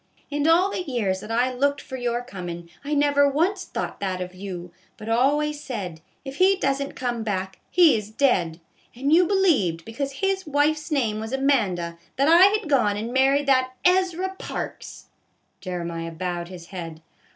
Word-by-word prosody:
In 290 +1 0
all 355 +4 +4
the - - -2
years 230 - -1
that 210 - -10
I 245 +3 +1
looked 280 +3 +1
for 260 - -8
your 245 -1 -2
comin', 175 -7 -7
I 295 +1 -1
never 285 0 +4
once 360 +7 0
thought - - -5
that 190 -2 -2
of 180 0 -5
you, 185 -2 -7 0.3
but 215 - -10
always 290 +6 +1
said, 185 - -5 0.2
if 270 +1 -7
he 380 +1 +5
does 275 -6 0
n't 280 - -5
come 240 -3 -2
back, 190 -3 -3
he 345 -6 +6
is 210 -1 -4
dead; 190 - +1 0.4
and 275 +5 0
you 350 +1 +6
believed, 280 - +2
because 275 +5 -4
his 385 +3 -1
wife's 300 +2 +1
name 235 -8 0
was 220 +3 -5
Amanda, 200 -12 0 0.2
that 275 +2 +2
I 340 +4 +8
had 420 -2 +1
gone 235 -8 +2
and 225 +3 -4
married 270 +2 +3
that 255 -2 +2
Ezra 370 0 +2
Parks! - - -7 0.2
" - - -46
Jeremiah 170 -2 -4
bowed 175 0 -4
his 175 -2 -11
head. 165 -4 -7
255 Hz, 180 wpm, -24 LUFS, 190-295 Hz, 0.4 s, I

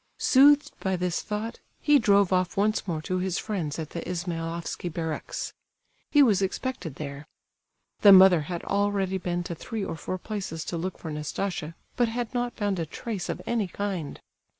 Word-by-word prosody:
Soothed 285 +2 +5
by 190 -1 0
this 180 -1 -1
thought, 215 +2 -4 0.2
he 295 -1 +5
drove 200 -3 +4
off 185 0 +1
once 210 +1 +1
more 160 -3 -2
to 185 +2 -1
his 185 -1 -1
friends 170 -9 -3
at 160 -2 -5
the 170 - -4
Ismailofsky 170 -1 -4
barracks. 160 -1 -4 0.6
He 290 -1 +6
was 205 -7 +4
expected 190 - -3
there. 145 0 -7 0.7
The 205 - +8
mother 185 -3 +8
had 175 -2 -4
already 200 -1 0
been 175 -1 -2
to 175 - -5
three 205 +5 -4
or - - -4
four 185 +3 -4
places 185 -5 -5
to 170 - -3
look 185 +2 -3
for 160 - -6
Nastasia, 150 +2 -3 0.2
but 240 - +3
had 235 +1 -3
not 245 -1 -1
found 205 -4 0
a 165 - -1
trace 200 +3 -5
of - - -4
any 225 -4 0
kind. 185 -5 -4
185 Hz, 175 wpm, -27 LUFS, 170-210 Hz, 0.7 s, The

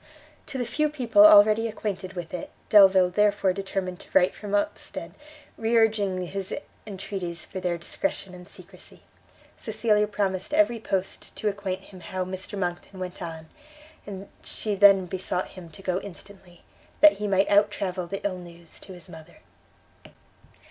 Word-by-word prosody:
To 275 - -5
the 245 - -1
few 305 +5 0
people 235 -8 +4
already 215 +2 +6
acquainted 200 -3 -5
with 175 -2 -7
it, 180 - -5 0.2
Delvile 190 -3 +7
therefore 205 -1 +2
determined 190 -2 -4
to - - -13
write 185 -1 +4
from 205 -1 -4
Ostend, 205 - -3 0.5
re 230 +1 +2
urging 205 -5 +2
his 195 +1 -4 0.3
entreaties 185 -4 -5
for 190 - -7
their 180 -2 -1
discretion 185 - -3
and 180 +1 -12
secrecy. 185 0 -14 0.5
Cecilia 215 -1 +1
promised 200 +4 -2
every 305 -7 +3
post 195 -3 -3
to 215 - -1
acquaint 195 -2 -4
him 190 -1 -14
how 185 0 -4
Mr 185 +2 -5
Monckton 180 +1 -4
went 185 0 -6
on, 160 -2 -7 0.6
and 195 -1 -7 0.2
she 215 - -4
then 195 -1 +6
besought 185 0 -3
him 180 -3 -11
to 195 +5 -13
go 185 0 -1
instantly, 190 -2 -12 0.4
that 310 -5 +7
he 210 - -2
might 195 0 +2
out 205 +1 +5
travel 185 -3 -4
the 195 +2 -6
ill 185 -2 -2
news 170 -1 -13
to 190 - -11
his 175 -2 -12
mother. 160 +1 -13
195 Hz, 160 wpm, -26 LUFS, 180-210 Hz, 0.6 s, Delvile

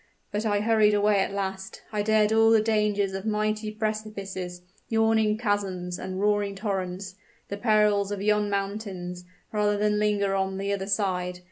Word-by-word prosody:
But 210 +1 -1
I 205 -1 +1
hurried 215 -1 +4
away 205 0 +3
at 195 - 0
last 195 -1 -4
I 210 - 0
dared 215 0 +3
all 225 0 +5
the 225 -1 +6
dangers 210 -2 +1
of 195 0 -4
mighty 215 0 0
precipices, 210 -4 -4 0.3
yawning 220 -1 +2
chasms, 195 -5 -2
and 185 0 -5
roaring 205 -1 +1
torrents 190 -2 -3 0.4
the 200 - -4
perils 210 -2 +3
of 205 - -3
yon 210 0 +1
mountains 195 -3 -4 0.3
rather 210 -1 +1
than 210 0 +1
linger 205 -2 +1
on 190 0 -1
the 200 +1 -1
other 195 -1 -3
side. 185 -3 -1
205 Hz, 160 wpm, -26 LUFS, 195-215 Hz, 0.4 s, the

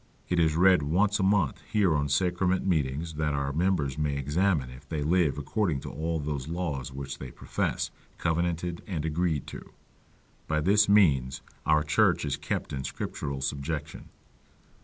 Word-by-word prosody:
It 90 - +2
is 80 -2 +3
read 90 0 +5
once 100 +8 +2
a - - +1
month 95 -6 +2
here 100 -7 +3
on 70 0 0
sacrament 90 +5 +1
meetings, 80 -2 0
that 75 -1 0
our 70 0 -1
members 75 -4 0
may 75 -2 0
examine 75 -1 +1
if 65 +2 -14
they 75 -3 -2
live 80 -3 +2
according 80 +1 -1
to - - -7
all 80 +2 -2
those 70 -2 -3
laws 75 -7 -3
which 70 +1 -6
they 65 - -6
profess, - - -2 0.3
covenanted 85 +1 -1
and 80 -6 -3
agreed 80 -2 0
to; - - -10 0.7
by 75 0 +1
this 100 +6 +4
means 70 -11 +3 0.2
our 75 -1 +4
church 75 0 +2
is 70 -1 -1
kept - - -4
in 65 -1 -3
scriptural 70 +1 -4
subjection. 70 +2 -4
75 Hz, 160 wpm, -28 LUFS, 70-90 Hz, 0.7 s, read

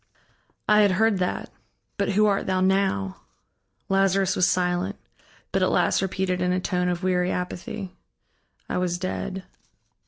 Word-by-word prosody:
"I 210 0 +6
had 200 -2 +4
heard 215 0 +2
that. 180 - -2 0.5
But 200 0 0
who 210 +2 +4
art 200 -1 +1
thou 185 -1 +1
now?" 185 - +1 0.7
Lazarus 195 0 +2
was 180 - +3
silent, 180 +2 0 0.6
but - - +1
at - - +3
last - - +2
repeated 185 -1 -1
in 180 0 +1
a 180 - +1
tone 180 -1 0
of 175 +1 -3
weary 180 -1 +1
apathy: 180 +1 -4 0.8
"I - - -1
was 175 -1 0
dead." 185 +1 -4
185 Hz, 150 wpm, -25 LUFS, 180-195 Hz, 0.8 s, I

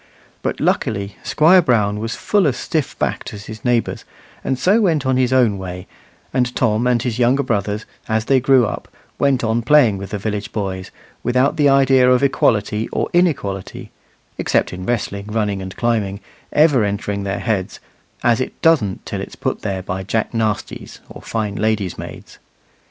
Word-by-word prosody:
But, - - -2
luckily, 100 -2 -1
Squire 170 +5 +5
Brown 105 -8 +1
was 115 +1 -3
full 200 -5 +2
as 130 - +1
stiffbacked 155 -7 -2
as 100 0 -9
his 110 0 -9
neighbours, 120 -2 0 0.4
and 130 - -1
so 200 - +3
went 160 -9 +1
on 130 0 +2
his 130 0 +2
own 120 -6 +3
way; 90 -1 -6 0.5
and 125 -1 0
Tom 115 0 +1
and 125 -1 +3
his 125 -2 -2
younger 125 +3 +3
brothers, 105 -3 -2 0.2
as 110 0 0
they 135 +1 +4
grew 130 -1 +4
up, - - -5 0.3
went 135 -3 +2
on 115 +1 +1
playing 120 -6 +4
with 100 - -7
the 105 - -3
village 105 0 -4
boys, 95 -3 -4 0.3
without 125 +3 +2
the 145 -2 +4
idea 135 -2 +5
of 125 +1 +3
equality 110 -5 +1
or - - -2
inequality 140 - -1 0.5
(except - - +1
in 90 +1 -7
wrestling, 100 -4 -2
running, 105 -2 -1
and 95 -1 -7
climbing) 105 -5 0 0.3
ever 150 -6 +4
entering 100 0 -2
their 100 0 -2
heads; 100 -5 -2 0.4
as 120 0 +3
it - - -5
doesn't 130 - +2
till - - -4
it's - - -8
put - - -3
there 95 -3 -3
by 95 0 -4
Jack 110 +3 -1
Nastys 110 -2 -3
or - - -11
fine 110 -3 -3
ladies' 110 -4 -1
maids. - - -10
115 Hz, 175 wpm, -19 LUFS, 100-130 Hz, 0.5 s, Squire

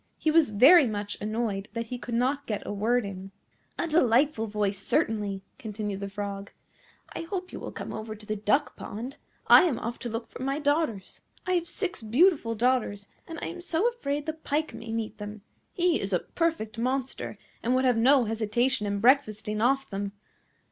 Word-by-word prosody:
He 315 - +1
was 320 -4 +5
very 270 - +7
much 205 -1 -3
annoyed 215 -2 -2
that 230 0 -3
he 250 - -4
could 235 -1 -4
not 265 +4 0
get 210 -3 -3
a - - -3
word 225 +3 +1
in. 195 -1 -7 0.5
"A - - 0
delightful 260 -5 +3
voice, 205 -2 -1
certainly," 205 -3 0 0.2
continued 210 -4 -4
the 200 0 -4
Frog; 200 0 -5 0.6
"I - - -4
hope 360 +2 -5
you - - -5
will - - -6
come - - -6
over 215 0 -5
to 210 0 -14
the 215 - -2
duck 215 +8 +1
pond. 240 +6 -7 0.3
I - - +9
am 290 -9 +1
off 235 +1 -4
to 240 - -4
look 230 +1 -4
for - - -9
my 275 +2 -1
daughters. 290 - -1 0.2
I 365 - -1
have 345 -2 +1
six 375 - -2
beautiful 240 - +3
daughters, 225 -4 0 0.2
and 330 - -7
I - - -2
am 350 0 -7
so 350 +4 +1
afraid 290 -12 -3
the 315 - -2
Pike 315 0 -2
may 230 -1 -7
meet 225 -1 -3
them. 210 0 -7 0.3
He 350 -2 +1
is 195 0 -3
a - - +5
perfect 315 -10 -2
monster, 260 +2 -2 0.2
and 245 +2 +1
would 260 +1 +2
have 250 -2 +4
no 255 +3 +5
hesitation 220 +1 0
in 200 0 -1
breakfasting 215 -4 +2
off 270 +3 +2
them. 200 0 -4
230 Hz, 195 wpm, -28 LUFS, 210-285 Hz, 0.6 s, I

